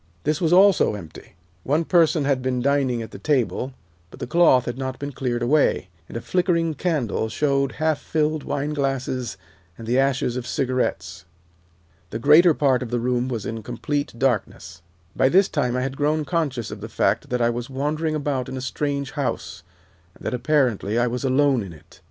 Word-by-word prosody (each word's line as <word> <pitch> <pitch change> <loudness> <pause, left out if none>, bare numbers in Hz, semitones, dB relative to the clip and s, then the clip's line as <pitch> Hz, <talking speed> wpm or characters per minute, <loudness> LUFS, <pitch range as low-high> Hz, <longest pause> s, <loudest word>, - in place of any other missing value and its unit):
This 150 +3 0
was 165 -2 +2
also 190 - +5
empty. 85 -4 -11 0.3
One 155 +5 +1
person 165 -4 +3
had 135 -2 +1
been 130 -1 -1
dining 130 -3 +1
at 110 - -10
the - - -9
table, 135 -2 0 0.4
but - - -14
the - - -3
cloth 130 -4 +4
had 120 - -3
not 130 0 -4
been 140 0 -5
cleared 120 -3 -2
away, 135 -7 +2 0.2
and - - -5
a - - -6
nickering 170 -3 +2
candle 135 - -1
showed 140 -1 0
half 155 +3 0
filled 155 -1 -1
wineglasses 135 -4 -2 0.4
and 115 - -9
the 120 +3 +1
ashes 135 -2 +1
of 125 - -5
cigarettes. 90 -10 -2 0.8
The 110 - -4
greater 150 +7 +6
part 135 -3 +2
of 125 - -4
the 120 - -1
room 125 +1 0
was 115 -5 -4
in 110 0 -4
complete 145 +6 -3
darkness. 95 -8 -2 0.3
"By 130 - +3
this 190 +5 +5
time 125 0 -1
I - - 0
had 135 +1 -3
grown 150 +1 +1
conscious 145 -9 -2
of - - -8
the - - -7
fact - - 0
that 125 - -1
I 120 0 +2
was 120 +1 -5
wandering 150 +4 -1
about 140 -4 -2
in 130 - -5
a - - -4
strange 140 +1 -2
house, 80 - -3 0.5
and - - -15
that, - - -2
apparently, 125 -6 +1
I 120 - +3
was 125 +2 -3
alone 135 -1 +3
in 95 -4 -7
it. 75 - -18
130 Hz, 190 wpm, -23 LUFS, 120-150 Hz, 0.8 s, greater